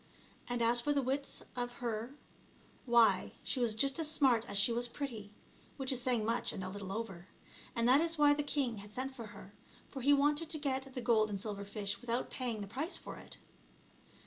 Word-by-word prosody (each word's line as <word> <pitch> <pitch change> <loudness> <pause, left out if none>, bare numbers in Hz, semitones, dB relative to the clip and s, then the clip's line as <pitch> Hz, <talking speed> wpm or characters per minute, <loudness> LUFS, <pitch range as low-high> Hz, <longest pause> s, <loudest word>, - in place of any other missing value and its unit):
And 245 -1 0
as 235 +1 +4
for 290 +4 +1
the 280 - +2
wits 275 +2 -2
of 245 -1 -3
her, 235 +1 -4 0.7
why, 235 -1 +4
she 260 - 0
was 235 -3 +2
just 275 +6 +2
as 315 -2 +1
smart 260 -7 +4
as 200 - -2
she 200 +4 +4
was 240 +1 0
pretty 235 -6 -5 0.5
(which 270 -2 -1
is 255 -1 0
saying 245 -3 +2
much 230 +1 0
and 190 - -5
a 185 - -4
little 195 0 -6
over), 195 -4 -5 0.5
and 235 0 +2
that 265 +4 +6
is 335 0 0
why 295 -1 +6
the 290 - 0
king 275 -6 -1
had 205 +1 -10
sent 260 +4 -3
for 235 -4 -8
her, 200 -1 -12 0.4
for 270 - -6
he 280 +3 +4
wanted 295 +3 +3
to 320 - -1
get 270 -2 -2
the 250 - -2
gold 225 -3 +3
and 200 -2 -3
silver 200 -1 -4
fish 200 0 -4
without 245 0 -1
paying 240 -5 -2
the 200 - -5
price 285 - -3
for - - -9
it. - - -11
245 Hz, 215 wpm, -34 LUFS, 215-275 Hz, 0.7 s, that